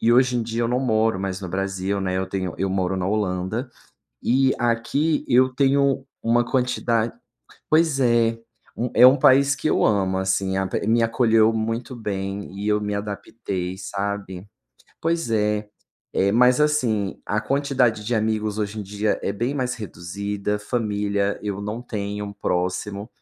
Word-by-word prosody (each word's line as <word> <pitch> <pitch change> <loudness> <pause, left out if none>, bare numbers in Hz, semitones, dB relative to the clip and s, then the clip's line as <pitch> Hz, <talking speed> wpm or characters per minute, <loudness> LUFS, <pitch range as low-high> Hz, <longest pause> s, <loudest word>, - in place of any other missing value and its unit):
E 115 - +3
hoje 125 +1 +4
em - - 0
dia 115 +1 -2
eu 115 - 0
não 125 +1 +1
moro 110 -5 +1
mais 95 0 -3
no 90 - -4
Brasil, 95 +1 -2
né, 95 -1 -1
eu 95 - 0
tenho 95 -2 -3
eu 95 0 -1
moro 95 0 0
na 90 0 -1
Holanda 95 -3 -1 0.5
e 130 +2 +3
aqui 120 +7 0
eu 130 +1 +4
tenho 135 0 +2 0.2
uma 120 +1 +2
quantidade 120 -3 0 0.6
pois 155 -3 +3
é, 115 -2 +3 0.6
é 125 - +9
um 130 - +7
país 135 +1 +5
que 155 - -1
eu - - +2
amo, 95 -3 +1
assim, 95 0 0
a 95 -1 0 0.2
me 115 +1 +3
acolheu 115 -1 +3
muito 115 +3 -3
bem 100 -3 -4
e 105 - -3
eu 105 0 +2
me 105 0 -2
adaptei, 100 -2 -4
sabe? 100 -1 -4 0.6
Pois 165 -6 -1
é, 105 -1 0 0.7
mas 125 +3 +5
assim 120 -10 +1
a 105 +1 -1
quantidade 125 -3 +1
de 120 +2 -1
amigos 110 -1 -1
hoje 105 +1 -3
em - - -4
dia 105 +2 -1
é 100 - -1
bem 120 +7 -2
mais 125 -2 -1
reduzida, 100 +1 -4
família 105 -3 -1
eu 100 -1 -3
não 105 +3 -4
tenho 105 -3 -5
próximo, 100 +3 -2
105 Hz, 160 wpm, -23 LUFS, 100-120 Hz, 0.7 s, é